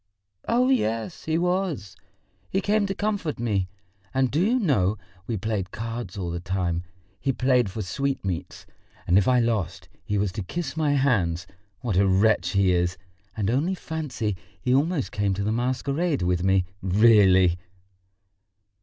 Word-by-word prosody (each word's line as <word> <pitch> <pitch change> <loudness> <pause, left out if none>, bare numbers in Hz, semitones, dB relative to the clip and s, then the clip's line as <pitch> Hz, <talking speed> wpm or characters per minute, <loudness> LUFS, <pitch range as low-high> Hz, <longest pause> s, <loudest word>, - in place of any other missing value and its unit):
"Oh, 250 +2 +3
yes, 115 - -1
he 160 0 +1
was; 175 - -1 0.5
he 190 - +1
came 205 0 +1
to 195 - -3
comfort 205 -7 -2
me, 100 -6 -1 0.5
and 130 -1 +2
do 150 - +1
you 235 +6 +3
know, 110 - +2 0.3
we 115 - -1
played 100 -2 -2
cards 115 0 -5
all 90 -3 -3
the 85 - -3
time. 90 -2 -1 0.4
He 135 - 0
played 125 -3 +2
for 105 +3 -4
sweet 135 +7 -2
meats, 90 -3 -4 0.4
and 85 - +2
if 95 -1 +4
I 125 -1 +4
lost 115 -7 -1
he 105 - -1
was 100 -1 0
to 105 +2 -4
kiss 140 - -4
my 155 -2 +1
hands. 100 - +1 0.4
What 115 -8 -1
a 100 +1 +4
wretch 100 +5 +3
he 100 -2 +3
is! 90 +1 +1 0.4
And 105 0 0
only 155 +10 +1
fancy, 130 - -3 0.2
he 125 +8 0
almost 145 +2 +1
came 100 -2 0
to 100 - -2
the 105 - 0
masquerade 135 - 0
with 90 0 +1
me, 95 -1 +3 0.2
really!" 95 -3 +5
115 Hz, 165 wpm, -25 LUFS, 95-145 Hz, 0.5 s, really